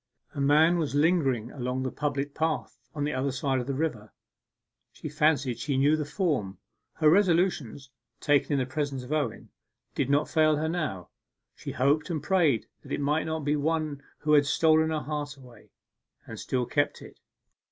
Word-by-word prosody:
A 140 - -4
man 155 +5 +4
was 150 -4 -2
lingering 145 -7 +2
along 125 0 -3
the 130 - -2
public 145 -1 -3
path 160 -5 -2 0.2
on 145 - -2
the 150 - -1
other 130 +2 -1
side 135 0 -1
of 125 - -5
the 140 - -2
river; 125 -8 -3 0.8
she - - -8
fancied 145 -5 +1
she 140 +1 -1
knew 145 +3 +4
the 155 -1 -2
form. 145 - -1 0.4
Her 155 - +1
resolutions, 165 - +2 0.3
taken 145 0 +2
in - - +2
the 130 - 0
presence 135 0 -3
of 130 +4 -5
Owen, 150 -2 -2 0.4
did 135 - -1
not 145 +2 +2
fail 155 -1 +3
her 155 +2 -1
now. 155 - -3 0.5
She - - -7
hoped 145 +6 +1
and 155 -4 -3
prayed 160 - +2 0.2
that - - -14
it - - -1
might 150 +2 0
not 160 -2 -3
be 150 +1 +2
one 155 -1 -1 0.2
who 150 - 0
had 145 -1 +5
stolen 160 +1 +3
her 155 -1 -1
heart 145 -1 -5
away, 125 -5 -16 0.6
and - - -9
still 125 -1 -1
kept - - -1
it. - - -14
145 Hz, 185 wpm, -27 LUFS, 135-155 Hz, 0.8 s, had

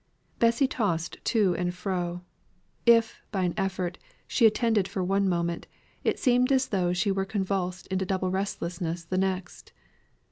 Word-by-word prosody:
Bessy 235 +4 +4
tossed 175 -10 -1
to 210 -6 +3
and 180 0 -1
fro. 180 -1 -3 0.6
If, 230 -1 +4
by 195 -3 0
an 175 -1 0
effort, 190 -3 -2 0.3
she 230 - +5
attended 220 -3 +2
for 190 - -3
one 195 +1 +2
moment, 170 -1 -1 0.4
it - - +1
seemed 250 0 +3
as 265 -1 +2
though 180 -3 +1
she 180 +3 +1
were 195 0 0
convulsed 190 -2 -2
into 190 0 -1
double 185 -1 0
restlessness 175 -3 -3
the 185 +2 -1
next. 190 -1 -3
190 Hz, 150 wpm, -27 LUFS, 180-210 Hz, 0.6 s, she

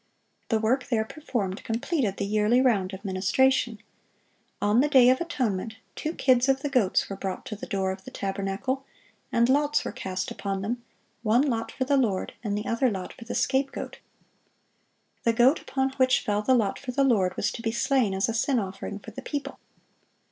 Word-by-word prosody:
The 225 - +3
work 245 +5 +1
there 225 -4 +1
performed 220 -9 -4
completed 235 - -1
the 200 - -1
yearly 210 +4 +3
round 210 -8 +2
of 195 +2 -9
ministration. 220 +5 +2 0.8
On 210 +4 +3
the 295 - +2
day 255 -3 +7
of 260 - +1
atonement, 225 - -2 0.2
two 315 - -3
kids 255 0 +3
of 270 0 +2
the 290 - 0
goats 230 -9 +2
were 195 - -5
brought 190 -1 -5
to 215 - -5
the 210 - -8
door 195 -4 0
of 190 0 -7
the - - -9
tabernacle, 195 +7 -3 0.5
and 235 0 +3
lots 290 +3 +2
were - - -2
cast 190 0 -4
upon 195 -1 -3
them, 235 +3 -3 0.4
"one 235 +3 +3
lot 230 -6 -1
for 260 - -2
the 280 +1 +3
Lord, 215 -8 0
and 205 -2 -1
the 210 - -4
other 235 +3 +2
lot 190 -4 -5
for 235 - -12
the 230 - -5
scapegoat."(691) 275 +1 -5
The 230 - +3
goat 250 +6 +4
upon 265 0 -1
which 255 -1 +4
fell 205 0 0
the 260 +4 +3
lot 210 -5 +1
for 255 - -5
the 275 +3 +2
Lord 195 -9 +2
was - - 0
to 230 - -7
be 225 -1 -1
slain 235 -4 +1
as 195 - +1
a 230 - -1
sin 250 +4 +1
offering 195 -1 -4
for 215 +2 -11
the - - -8
people. 290 -2 -5
230 Hz, 200 wpm, -26 LUFS, 200-265 Hz, 0.8 s, day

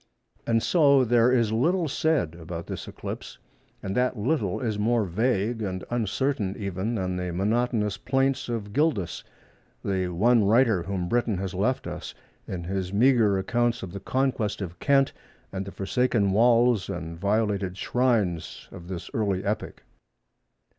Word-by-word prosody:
And 115 -1 +2
so 140 -6 +5
there 120 +1 +4
is 115 -4 +2
little 165 +10 +1
said 145 - 0
about 85 0 -7
this - - -6
eclipse, - - -7 0.5
and 95 0 -3
that 125 0 +1
little 105 - 0
is 110 -4 -2
more 115 +1 +2
vague 110 +3 0
and 95 -3 -3
uncertain 120 -2 -1
even 100 +3 -3
than 95 -3 -2
the 90 -1 -3
monotonous 105 +2 0
plaints 135 +2 0
of 105 -4 -4
Gildas—the 100 - -3
one 110 +6 +3
writer 110 -2 +4
whom 90 0 -3
Britain 120 -2 +1
has 95 0 -4
left 105 +8 0
us, - - -6 0.3
in 90 -2 -5
his 95 +1 -3
meagre 110 -2 +4
accounts 120 +4 0
of 95 - -6
the 100 - -5
conquest 125 -1 -1
of 90 -3 -6
Kent, 140 -1 +3 0.4
and 95 0 -4
the - - -6
forsaken 100 0 +1
walls 115 -1 +4
and 85 -3 -5
violated 100 -2 0
shrines 110 -11 0
of 85 - -10
this 90 -2 -6
early 100 -4 -1
epoch." 105 +2 -3
105 Hz, 145 wpm, -26 LUFS, 95-120 Hz, 0.5 s, so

